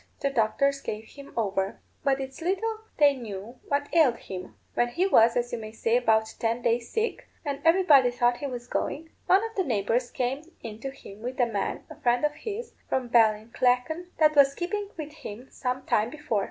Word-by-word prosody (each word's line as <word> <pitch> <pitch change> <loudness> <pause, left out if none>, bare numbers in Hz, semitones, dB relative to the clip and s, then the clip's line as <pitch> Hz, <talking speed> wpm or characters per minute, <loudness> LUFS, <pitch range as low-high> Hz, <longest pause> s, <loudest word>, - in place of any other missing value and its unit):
The 275 - +1
doctors 275 +4 +1
gave 215 +1 -4
him 280 -1 -12
over. 195 -3 -1 0.2
But 275 -1 +2
it's 265 +3 -6
little 430 +6 -1 0.2
they 290 -2 +6
knew 230 0 -8
what 285 0 0
ailed 295 -8 +5
him. 185 -1 -8 0.2
When 240 - +2
he 340 +10 0
was, 230 - +5
as 240 0 -1
you 240 - -2
may 215 -1 -7
say, 225 +1 +1
about 220 -2 +2
ten 230 +1 0
days 235 0 +1
sick, 450 +1 -2 0.2
and 280 -1 -3
everybody 325 -7 +6
thought 240 0 +2
he 285 - -4
was 245 -2 -6
going, 320 +5 -3 0.2
one 385 +3 +5
of 450 - -15
the 380 - +1
neighbours 240 - 0
came 265 +7 -3
in 220 -2 -7
to 270 - -4
him 215 -6 -12
with 250 +3 -5
a 245 - +5
man, 210 -4 -2
a - - -13
friend 245 +3 +3
of 300 - 0
his, 435 +9 -6 0.2
from 255 -2 -1
Ballinlacken, 245 +8 +2
that 305 -1 +4
was 280 -1 +6
keeping 405 +3 -3
with 305 -2 -5
him 230 +5 -9
some 255 0 -3
time 215 +2 +2
before. 295 -7 -2
255 Hz, 200 wpm, -27 LUFS, 230-300 Hz, 0.2 s, they